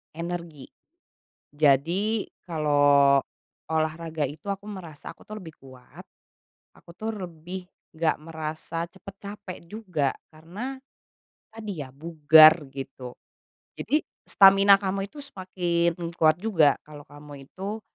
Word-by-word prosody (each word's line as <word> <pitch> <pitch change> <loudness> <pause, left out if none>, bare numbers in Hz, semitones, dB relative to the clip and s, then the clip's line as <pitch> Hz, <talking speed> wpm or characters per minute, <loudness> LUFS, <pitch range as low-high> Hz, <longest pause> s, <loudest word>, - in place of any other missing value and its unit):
energi. 170 -4 -6 0.8
Jadi, 165 +10 +2 0.2
kalau 145 -4 +4 0.5
olahraga 160 0 -1
itu, 150 +8 -8
aku 200 0 -4
merasa 180 -8 -9
aku - - -25
tuh 215 - -9
lebih 170 -6 -10
kuat, 130 -2 -14 0.8
aku 170 - -16
tuh 220 +4 -4 0.2
lebih 175 +2 -8 0.3
enggak 160 -1 +2
merasa 160 +1 -5
cepet 190 +2 -13
capek 200 -2 -8
juga, 180 -8 -2 0.2
karena 190 +13 -7 0.7
tadi 210 -9 -6
ya, 130 - -14
bugar 155 +1 +6
gitu. 135 -2 -8 0.6
Jadi 300 +2 -1 0.2
stamina 195 0 +6
kamu 195 0 -3
itu 300 - -16
semakin 175 - -2
kuat 155 -2 +3
juga 175 -8 +3
kalau 150 -1 -11
kamu 145 -1 -12
itu, 205 +4 -6
165 Hz, 115 wpm, -26 LUFS, 150-195 Hz, 0.8 s, bugar